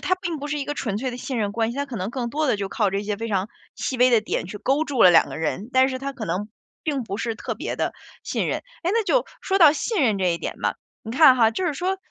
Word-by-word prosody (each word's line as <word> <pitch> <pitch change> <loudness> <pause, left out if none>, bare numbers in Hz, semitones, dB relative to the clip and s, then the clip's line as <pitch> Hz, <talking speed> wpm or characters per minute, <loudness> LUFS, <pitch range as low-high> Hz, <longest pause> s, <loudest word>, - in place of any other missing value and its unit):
它 370 - +2
并 350 -4 -4
不 285 - -5
是 295 0 -2
一 280 - -4
个 290 - -2
纯 215 -8 -2
粹 260 +2 -2
的 245 - -6
信 250 0 -4
任 205 -2 -1
关 225 +1 0
系， 240 - -7
它 285 - -1
可 260 -4 -6
能 190 +1 -3
更 240 -1 -3
多 300 +5 -1
的 260 - +3
就 200 -1 -3
靠 205 -1 0
这 195 +1 -1
些 210 0 -2
非 230 +2 -4
常 195 -1 0 0.3
细 260 - -3
微 250 +1 +5
的 235 -2 +5
点 215 - -2
去 205 +3 -7
勾 275 +8 +1
住 275 -6 +1
了 180 - +9
2 170 - +5
个 - - -6
人， 190 +8 -3
但 260 0 +5
是 260 -1 -3
它 275 +1 -4
可 235 -5 -6
能 185 +5 -2 0.3
并 285 -4 -1
不 200 -4 -5
是 225 +1 -2
特 - - -5
别 - - -4
的 - - -1 0.3
信 - - -2
任。 - - -1 0.2
哎， 350 - +1
那 455 +1 +2
就 - - +2 0.2
说 385 - 0
到 320 -6 +8
信 390 +3 -1
任 220 -6 +2
这 180 -2 +2
一 - - -2
点 - - -4
嘛， - - 0 0.3
你 225 - -7
看 265 +2 +7
哈， 225 -3 +5
就 370 +11 -3
是 325 - +1
说 365 +6 -1
245 Hz, 320 characters per minute, -23 LUFS, 210-290 Hz, 0.3 s, 了